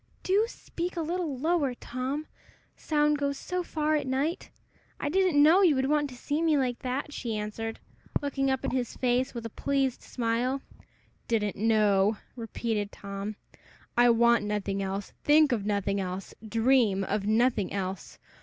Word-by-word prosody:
"Do 400 +4 +3
speak 350 -6 -6
a - - 0
little 330 -4 -2
lower, 295 -3 +1
Tom: 260 +6 -4 0.5
sound 300 -1 +1
goes 280 -1 -1
so 360 +4 -3
far 310 -3 0
at 295 - -1
night! 275 +6 -1 0.5
I 285 - -1
didn't 360 -4 +4
know 335 +6 +6
you 340 -7 +5
would 265 +1 +1
want 295 -1 +2
to 250 - -10
see 290 +5 -2
me 320 -3 +3
like 250 -3 0
that," 270 +3 -3
she 230 -6 -3
answered, 220 +2 -4 0.4
looking 275 -1 -1
up 265 -1 -1
in - - -1
his 250 -2 -2
face 250 +1 +1
with 235 -1 -5
a 230 - -5
pleased 270 -1 0
smile. 245 +3 -1 0.6
"Didn't 210 -3 0
know!" 210 -1 +3 0.2
repeated 225 -3 -3
Tom. 200 +1 -6 0.6
"I 240 0 +6
want 235 -1 +4
nothing 205 -1 -2
else, 195 +1 -4
think 300 -1 +5
of 210 -4 -1
nothing 200 -1 0
else, 185 0 -4 0.2
dream 225 -4 +3
of 200 +1 -2
nothing 220 -3 +2
else. 190 -2 -4
250 Hz, 165 wpm, -28 LUFS, 210-290 Hz, 0.6 s, know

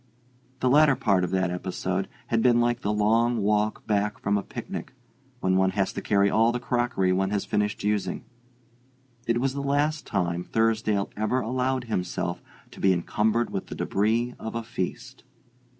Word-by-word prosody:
The 130 - +2
latter 150 0 +6
part 95 -5 +2
of 90 - -1
that 95 -1 0
episode 95 +1 -2 0.2
had 115 -1 +2
been 120 -1 +4
like 120 0 +1
the 105 - 0
long 115 +3 +2
walk 105 0 0
back 105 0 0
from 100 0 0
a 100 - +1
picnic, 125 - -7 0.5
when 95 0 +2
one 95 0 +3
has 95 - +1
to - - -4
carry 100 -1 +3
all 115 +3 +3
the 125 - -2
crockery 120 -7 0
one 95 +1 +1
has 100 -1 -1
finished 105 0 -1
using: 100 -3 -1 1.0
it 115 0 +2
was 130 +1 0
the 140 - -3
last 145 +2 0
time 85 0 -1
Thursdale 110 -2 0
ever 110 +5 0
allowed 130 +2 -1
himself 90 -5 -3 0.3
to - - -13
be 95 - +4
encumbered 110 +6 0
with 95 - -4
the - - -7
debris 115 +4 0
of 110 - -6
a 115 - -2
feast. 105 -5 -5
105 Hz, 175 wpm, -26 LUFS, 95-120 Hz, 1.0 s, latter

